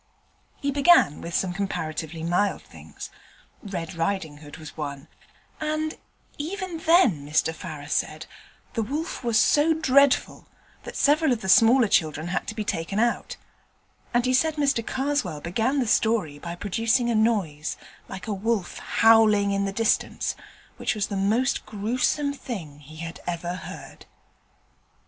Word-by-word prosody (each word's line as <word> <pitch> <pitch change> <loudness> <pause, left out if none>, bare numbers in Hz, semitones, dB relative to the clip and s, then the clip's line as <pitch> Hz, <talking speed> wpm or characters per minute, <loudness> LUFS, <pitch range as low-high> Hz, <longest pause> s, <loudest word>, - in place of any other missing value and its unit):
He 280 - -1
began 280 - +4
with 170 - -5
some 185 -2 0
comparatively 160 -4 -4
mild 180 +4 0
things. - - -11 0.5
Red 190 -3 -5
Riding 165 -3 -2
Hood 145 -1 -12
was 155 -3 -11
one, 145 -1 -6 0.5
and 310 0 -2 0.4
even 360 +2 -4
then, 320 - +4
Mr 150 +2 +1
Farrer 150 -2 -8
said, 155 +1 -2 0.5
the 225 - -1
wolf 290 - -4
was 235 -2 +2
so 305 +6 +4
dreadful 280 -3 +3 0.4
that - - -8
several 300 +1 +3
of 235 -3 0
the 190 - -5
smaller 230 +5 +6
children 160 -5 +1
had 180 - -2
to 215 - -5
be 215 - -2
taken 180 0 -3
out: 235 +1 0 0.7
and 240 +1 +2
he 255 - +2
said 315 +4 +2
Mr 275 -5 +1
Karswell 270 - -2
began 220 - -1
the 260 - +1
story 215 -10 +1
by 170 +3 -6
producing 225 +6 0
a - - +1
noise 205 -10 0 0.3
like 190 -1 -7
a 215 - -2
wolf 205 -1 -2
howling 215 -3 +4
in 200 0 0
the 195 - -2
distance, 225 +2 0 0.4
which - - -1
was 205 -2 -2
the 200 - -3
most 220 +7 +1
gruesome 245 +7 0
thing 175 - -7
he 150 +2 -14
had 165 +1 -7
ever 175 0 -3
heard. 180 - -10
210 Hz, 150 wpm, -25 LUFS, 165-260 Hz, 0.7 s, smaller